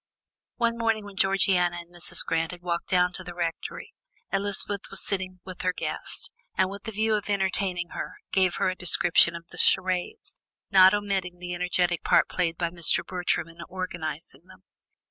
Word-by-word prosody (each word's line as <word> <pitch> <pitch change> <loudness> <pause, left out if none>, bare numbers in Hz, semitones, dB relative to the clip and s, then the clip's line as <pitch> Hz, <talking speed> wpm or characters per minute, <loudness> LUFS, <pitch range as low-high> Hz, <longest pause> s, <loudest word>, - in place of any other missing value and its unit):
One 235 -1 0
morning, 225 -2 +1
when 200 -1 -10
Georgiana 185 -2 +3
and 175 0 -10
Mrs. 175 0 -1
Grant 165 0 0
had 175 -1 -9
walked 170 -1 -2
down 180 -1 +3
to 185 - -3
the 175 -1 -8
Rectory, 170 -2 -4 0.4
Elizabeth 200 0 -1
was - - -4
sitting 185 -2 -2
with 185 -1 -8
her 180 0 +1
guest, - - -4 0.2
and 190 -1 +2
with 200 +3 -9
the 225 - -3
view 220 +1 +1
of 210 -1 -1
entertaining 190 -3 0
her, - - -6 0.2
gave 185 -2 +3
her - - +1
a 185 - -2
description 175 -1 +4
of 170 0 -8
the - - -7
charades, 185 - +1 0.3
not 190 0 +8
omitting 195 -3 -2
the 180 0 -5
energetic 180 -1 +1
part - - +4
played 170 -2 -1
by 170 -1 -1
Mr. 170 0 +1
Bertram 180 -2 -1
in 165 0 -15
organizing 165 -5 -5
them. - - -17
180 Hz, 180 wpm, -27 LUFS, 175-195 Hz, 0.4 s, not